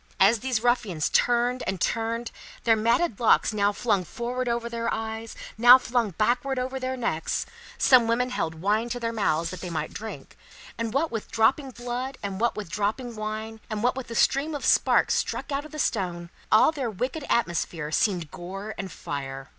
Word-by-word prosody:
As 210 +4 +5
these 245 -2 -1
ruffians 225 -10 +1
turned 245 +1 +2
and 190 -1 -2
turned, 230 +3 -1 0.3
their 225 -1 +5
matted 230 - +1
locks 230 -1 +4
now 205 -1 +2
flung 205 -2 0
forward 245 +7 -3
over 235 0 -1
their 235 0 -2
eyes, 220 0 -4 0.2
now 245 +2 +10
flung 240 -3 0
backward 245 +8 0
over 260 +1 -2
their 260 0 -3
necks, 195 -10 -1 0.3
some 250 -3 +5
women 250 +2 +1
held 165 -9 -2
wine 210 +7 0
to 245 +1 -3
their 230 -1 -2
mouths 170 -6 0
that 185 - -7
they 180 - -5
might 170 - -3
drink; 220 +1 -8 0.4
and 230 -1 -3
what 290 +6 0
with 225 -2 -4
dropping 265 +5 +2
blood, 245 +2 -5
and 195 0 -4
what 235 - +2
with 210 -3 -5
dropping 220 +5 -2
wine, 215 +1 -5
and 215 -1 -3
what 250 +1 +2
with 265 -1 -5
the 230 - -7
stream 290 +6 +2
of 285 - -4
sparks - - +4
struck - - -2
out 280 +1 -2
of 305 - -11
the 305 - -8
stone, 175 - -2 0.2
all 215 +8 +6
their 275 -6 -3
wicked 255 - -3
atmosphere 170 -7 -1
seemed 175 -4 0
gore 195 +4 -7
and 195 -2 -5
fire. 135 -2 -6
230 Hz, 190 wpm, -26 LUFS, 200-245 Hz, 0.4 s, now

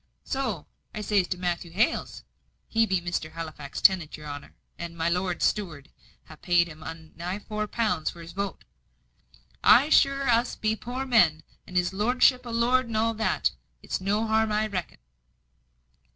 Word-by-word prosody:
So, 250 - -2 0.3
as 215 0 -5
I 205 -2 +5
zays 180 - -6
to 180 - -3
Matthew 175 -1 -2
Hales 200 +8 0 0.4
(he 225 0 +2
be 190 -2 +1
Mr. 170 -3 -3
Halifax's 155 -4 -7
tenant, 175 -6 +4
your 150 - -11
honour, 145 -1 -8 0.2
and 170 0 -6
my 165 +1 +1
lord's 180 0 0
steward 165 -9 -2 0.4
ha' 155 - -14
paid 175 -1 +3
'un 160 +1 -9
nigh 180 +3 -4
four 215 0 -4
pound 205 -9 0
for 170 - -10
his 170 0 -9
vote), 200 +3 -4 1.0
I 290 - +7
sure 275 -2 +4
us 240 +1 +2
be 215 0 0
poor 250 +4 -5
men, 175 -11 +4 0.2
and 180 - -3
his 180 +1 +1
lordship 250 +4 +3
a - - -5
lord 240 +2 +2
and 225 -2 -2
all 225 +1 +2
that 220 0 0 0.3
it's - - -3
no 205 +3 +1
harm, 220 0 +2
I 210 +1 +1
reckon." 185 -6 -4
190 Hz, 170 wpm, -27 LUFS, 170-225 Hz, 1.0 s, I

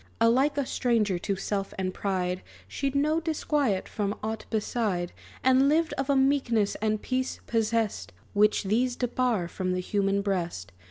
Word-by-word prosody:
Alike 260 +6 +3
a 280 - +1
stranger 220 -8 +1
to 195 +2 -1
self 195 +1 -3
and 185 -1 -2
pride, 185 -2 -1 0.3
She'd 275 - -2
no 305 +3 +2
disquiet 295 - 0
from 205 -1 -2
aught 220 0 -4
beside; 210 -5 -1 0.3
And 260 +2 +5
lived 315 +1 +2
of 270 +1 -3
a 280 - +4
meekness 265 -6 +2
and 215 -1 +1
peace 260 +2 -2
possest 225 - 0 0.2
Which 210 +1 +3
these 240 +5 +1
debar 245 -7 0
from 185 +1 -2
the 180 - -1
human 200 +1 0
breast. 170 - -2
220 Hz, 155 wpm, -27 LUFS, 195-260 Hz, 0.3 s, And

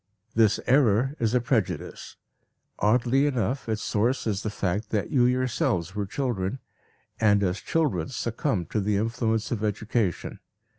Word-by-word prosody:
This 110 -2 +3
error 130 0 +3
is 115 +1 +1
a - - +5
prejudice. 115 -5 -2 0.6
Oddly 125 +6 +3
enough 125 -1 -1
its 110 -1 -1
source 120 +5 0
is 105 -3 -1
the 110 - -2
fact 100 +1 -2
that 105 -2 -1
you 125 -3 +4
yourselves 125 -8 0
were 100 -1 -3
children, 110 -3 -2 0.6
and 105 -2 +4
as 90 0 0
children 135 - 0
succumbed 115 - -2
to 110 - +1
the 100 0 +1
influence 115 0 -1
of 110 -3 -2
education. 105 -2 -1
110 Hz, 145 wpm, -26 LUFS, 105-125 Hz, 0.6 s, a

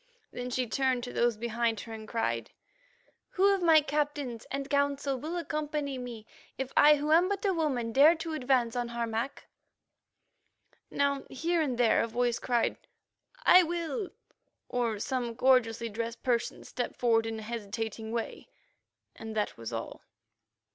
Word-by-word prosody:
Then 245 0 -5
she 250 0 0
turned 255 +1 0
to 245 - -6
those 235 -2 +2
behind 230 -1 -1
her 225 - -9
and 220 -1 -8
cried: 115 - -2 0.9
"Who 395 +2 +5
of 390 - -1
my 325 -3 +6
captains 290 -5 -2
and 275 0 -3
Council 280 -1 +1
will 310 +7 -4
accompany 300 -4 -3
me, 235 -3 -7 0.3
if 265 0 -4
I 300 0 +7
who 295 +1 -2
am 345 +4 +5
but 400 0 -2
a 390 - +3
woman 270 -9 -1
dare 295 +6 +7
to 325 0 -5
advance 255 -5 +1
on 245 -1 -1
Harmac?" 235 +2 -3 1.4
Now 280 -1 +1
here 335 +5 0
and 265 -6 -1
there 240 -2 +4
a - - 0
voice 240 +1 0
cried, 240 -2 0 0.7
"I 365 - +9
will," 345 +5 -2 0.6
or 235 -3 -1
some 240 +1 -2
gorgeously 235 -3 +3
dressed 230 +2 -5
person 240 -3 -1
stepped 245 - -4
forward 225 -2 +2
in 225 0 -4
a 220 - -7
hesitating 220 0 -5
way, 230 -1 -4 0.7
and 220 -1 -8
that 210 -1 -1
was 115 0 -7
all. 115 0 -5
250 Hz, 155 wpm, -30 LUFS, 230-295 Hz, 1.4 s, I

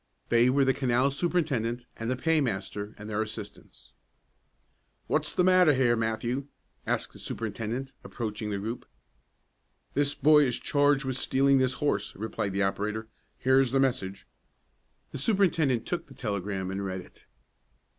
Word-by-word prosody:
They 120 +1 +5
were 135 +1 +3
the 135 - +3
canal 130 +1 +2
superintendent 135 -8 -1
and 115 +1 -4
the 130 - +1
paymaster 105 - -1
and 105 - -9
their 110 0 -1
assistants. 110 -2 -8 1.1
"What's - - -1
the 180 - +3
matter 180 -5 +5
here, 125 -2 +3
Matthew?" 115 +4 -2 0.4
asked - - -1
the - - -13
superintendent, 115 +4 -4
approaching 110 -2 -4
the 100 - -2
group. 110 +5 -5 1.1
"This 145 0 +2
boy 150 0 +6
is 125 -2 0
charged 145 -1 +2
with 130 -1 -1
stealing 135 +1 +3
this 130 0 +1
horse," 105 -9 -1
replied 100 -2 -3
the 100 0 +1
operator. 105 +3 -2 0.3
"Here's 130 -1 +3
the 135 - +3
message." 100 -7 -1 0.9
The - - -5
superintendent 160 - +2
took 175 - -3
the 135 - -14
telegram 100 -4 -3
and 100 +1 -3
read 95 -1 -3
it. - - -19
120 Hz, 145 wpm, -28 LUFS, 105-140 Hz, 1.1 s, boy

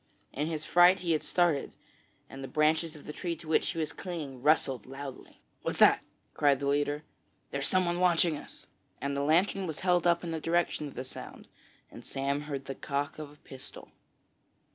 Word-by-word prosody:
In 150 +3 -1
his 155 -2 -3
fright 175 +2 +6
he 170 -2 0
had 155 - +2
started, 175 -6 +1 0.5
and 135 0 -9
the - - -4
branches 155 +2 +2
of 150 - -13
the 150 - -6
tree 170 0 -3
to 165 0 -12
which 160 - +2
he 165 - -4
was 155 -2 -2
clinging 155 -9 -6
rustled 135 -5 +2
loudly. 135 0 -9 0.2
'What's - - -3
that?' - - +6 0.3
cried 140 -2 +3
the 140 - -3
leader. 145 +1 +1 0.5
'There's 140 0 0
someone 180 -2 +1
watching 175 -2 +4
us,' - - -9 0.3
and 140 0 -2
the 140 - 0
lantern 180 +6 +2
was 160 -2 -4
held 180 -1 +3
up 170 0 +3
in 170 - -4
the 160 -1 -3
direction 165 -2 0
of 140 - -11
the 130 - -4
sound 130 - -10 0.4
and - - -11
Sam 140 +1 -2
heard 140 -2 -5
the 135 - -4
cock 140 +2 -3
of 150 -2 -6
a 145 - -16
pistol. 130 -1 -10
155 Hz, 195 wpm, -30 LUFS, 140-170 Hz, 0.5 s, fright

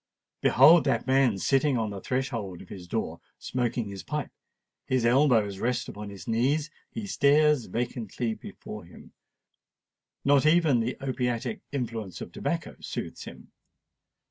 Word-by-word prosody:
Behold 155 +6 +7
that 135 - +1
man 130 -5 +3
sitting 135 +5 +2
on 110 -2 -1
the 100 -1 -6
threshold 115 -8 -3
of - - -18
his 90 -3 -9
door, - - -3 0.2
smoking 120 -2 -2
his 100 -1 -7
pipe:—his 130 -2 -5
elbows 120 -6 +3
rest 125 +2 -1
upon 105 0 -7
his 100 -1 -10
knees—he 145 - -1
stares 150 - +3
vacantly 115 -1 -3
before - - -9
him—not 140 -1 -5
even 155 -6 +4
the 115 +3 -2
opiatic 125 - -2
influence 115 - -4
of - - -7
tobacco - - -3
soothes - - -6
him. - - -12
125 Hz, 125 wpm, -27 LUFS, 110-140 Hz, 0.2 s, Behold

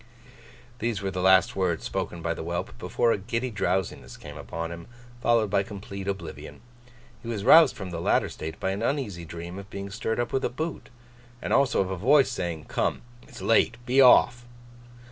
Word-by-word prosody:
These 115 -4 -2
were 95 - -1
the 90 - -3
last 95 0 +4
words 90 -5 0
spoken 85 -1 -4
by 85 0 0
the - - -7
whelp, 85 +1 -4
before 115 +6 +1
a - - 0
giddy 115 +5 -3
drowsiness 95 -2 -2
came - - -10
upon 85 0 -5
him, 85 0 -9 0.3
followed 115 -4 +2
by 100 - +3
complete 100 0 -7
oblivion. 85 -6 -6 0.6
He - - -10
was 105 -4 -3
roused 155 +4 +7
from 95 -2 -7
the 85 -1 -4
latter - - +2
state 80 +1 -7
by 95 - -1
an 100 +2 -3
uneasy 115 - -2
dream 85 +3 -7
of 100 0 -11
being 100 -1 -7
stirred 110 +2 -2
up 120 0 -2
with 135 - 0
a - - +1
boot, 155 +5 -5 0.5
and - - -3
also 135 -6 +3
of 95 -1 -2
a 95 - -3
voice 135 +8 +4
saying: 85 -3 -4
'Come, - - -1 0.2
it's 125 -4 -11
late. 115 +1 +3
Be 130 +2 +4
off! 120 -2 +6
100 Hz, 195 wpm, -26 LUFS, 85-120 Hz, 0.6 s, roused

